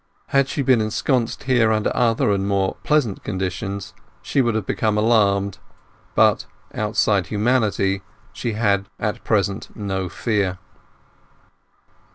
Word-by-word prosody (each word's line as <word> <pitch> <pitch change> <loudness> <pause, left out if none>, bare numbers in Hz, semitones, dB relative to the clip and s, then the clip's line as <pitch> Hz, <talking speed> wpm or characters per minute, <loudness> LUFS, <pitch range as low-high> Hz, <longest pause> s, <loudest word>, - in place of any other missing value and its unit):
Had 135 -1 +3
she 140 - -2
been 130 -3 +4
ensconced 115 +3 -1
here 120 -4 +3
under 110 -1 0
other 115 -3 +2
and 100 -1 0
more 100 -1 0
pleasant 145 -10 +1
conditions 95 0 -4 0.3
she 135 - +1
would 120 -3 +1
have 110 - -1
become 110 -1 0
alarmed; 100 -3 +2 0.6
but, - - +3 0.3
outside 105 -3 +1
humanity, 105 -3 +1 0.3
she 115 - -3
had 100 -3 +1
at 105 0 -3
present 100 -1 -1
no 95 -3 -3
fear. 100 -5 -1
105 Hz, 125 wpm, -21 LUFS, 100-115 Hz, 0.6 s, been